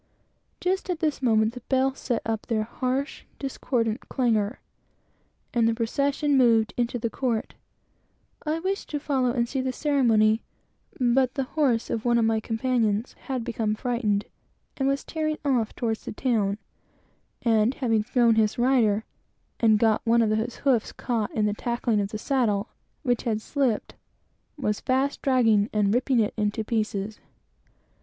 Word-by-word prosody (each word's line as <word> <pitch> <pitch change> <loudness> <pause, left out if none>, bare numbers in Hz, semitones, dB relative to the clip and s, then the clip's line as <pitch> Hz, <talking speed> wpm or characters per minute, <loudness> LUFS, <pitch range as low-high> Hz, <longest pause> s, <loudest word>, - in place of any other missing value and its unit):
Just 375 +1 -1
at 360 - 0
this 310 -4 -1
moment, 220 -3 +3
the 250 - -7
bells 265 0 +1
set 240 -3 -2
up 225 -1 -3
their 220 -2 0
harsh, 255 +5 -3
discordant 240 -4 -2
clang; 225 -3 +1 1.0
and 235 -2 +3
the 230 - +1
procession 280 +5 0
moved 230 -4 +4
into 245 0 -1
the 230 -1 -3
court. 240 -5 -2 0.9
I 310 0 0
was 330 +2 -6
anxious 390 +1 -1
to 295 - -4
follow, 270 -4 0
and 240 -1 0
see 265 +2 -2
the 260 0 -1
ceremony, 235 -7 +3 0.6
but 255 +1 +2
the 270 - 0
horse 260 -4 0
of 225 - -2
one 240 -1 +3
of 230 - +3
my 225 0 +2
companions 225 -1 0
had 260 -3 -2
become 225 -2 -1
frightened, 215 -4 -1 0.5
and 270 - 0
was 275 0 0
tearing 310 -1 -2
off 245 -6 +1
toward 225 -3 -1
the - - -8
town; 210 -5 0 0.9
and 225 +2 +3
having 225 -5 +1
thrown 235 +1 +3
his 220 -1 +2
rider, 240 -4 +3 0.6
and 220 -2 +5
got 220 0 +2
one 230 0 +4
of 215 - +1
his 220 +2 -1
feet 260 -6 +1
caught 230 -4 -1
in 215 -2 +2
the 210 -1 0
saddle, 225 -4 0 0.3
which 245 -4 +1
had 220 -3 -1
slipped, 255 -1 -1 0.6
was 210 -7 -1
fast 265 +2 0
dragging 225 -6 +3
and 205 -1 +2
ripping 250 +1 +2
it 210 -2 +1 0.2
to 220 - -3
pieces. 215 -2 -2
235 Hz, 155 wpm, -26 LUFS, 220-265 Hz, 1.0 s, and